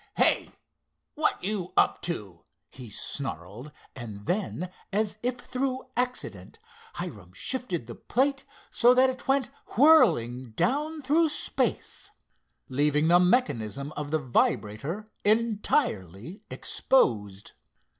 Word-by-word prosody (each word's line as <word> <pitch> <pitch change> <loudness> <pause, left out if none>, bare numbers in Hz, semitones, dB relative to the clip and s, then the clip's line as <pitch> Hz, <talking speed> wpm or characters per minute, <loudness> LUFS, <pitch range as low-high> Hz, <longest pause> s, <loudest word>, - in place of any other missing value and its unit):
"Hey, - - +3 0.6
what 310 -9 0
you 190 -2 -2
up - - +3
to?" 100 - -5 0.3
he 125 -3 -10
snarled 105 - -4 0.2
and 110 -5 -8
then, 180 -2 -2 0.2
as 210 +1 -1
if 250 +1 -1
through 255 +1 -3
accident, 250 - -3 0.4
Hiram - - -7
shifted 250 - -3
the 120 - -8
plate 270 - 0 0.3
so 245 +1 +5
that 260 +1 +5
it 255 - -11
went 270 -3 +1 0.3
whirling 155 - +5
down 300 - 0
through 310 +4 +3
space, - - -2 0.6
leaving 150 +3 +2
the 175 +1 +7
mechanism 145 - +1
of 150 -1 -5
the 155 - +1
vibrator 140 - -1
entirely 205 - 0
exposed. 105 - +1
180 Hz, 110 wpm, -27 LUFS, -, 0.6 s, the